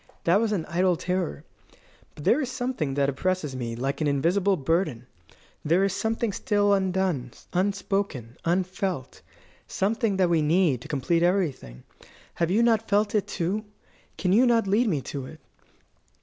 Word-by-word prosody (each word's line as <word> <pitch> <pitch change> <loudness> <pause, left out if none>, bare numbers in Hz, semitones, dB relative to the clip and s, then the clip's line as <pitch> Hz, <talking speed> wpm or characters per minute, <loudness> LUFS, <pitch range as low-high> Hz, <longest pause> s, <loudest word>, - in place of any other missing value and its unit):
That 180 +5 +3
was 225 -2 0
an 180 -7 -1
idle 180 +1 +1
terror. 180 - -2 0.7
But 145 - -10
there 270 - +3
is 260 -3 -3
something 245 - -2
that 140 -1 +2
oppresses 150 0 -1
me 120 -2 -4
like 135 +5 -3
an 155 - +1
invisible 180 +8 +2
burden. 140 -5 -1 0.6
There 170 +5 +3
is 195 -1 +1
something 225 +1 -1
still 205 0 +2
undone, 190 -9 0 0.2
unspoken, 185 - -1
unfelt 180 -4 -2 0.5
something 210 +1 0
that 185 -2 +3
we 170 -2 +2
need 155 -4 +2
to - - -10
complete 165 +3 0
everything. 160 - -1 0.5
Have 170 -1 0
you 215 +6 +3
not 225 -1 +2
felt 205 +1 +2
it, 210 -2 +1
too? 190 +6 -2 0.5
Can 185 0 +1
you 245 +5 +5
not 230 -2 +3
lead 210 +5 +2
me 155 -9 0
to 130 +1 -6
it?" - - -12
185 Hz, 160 wpm, -26 LUFS, 150-200 Hz, 0.7 s, you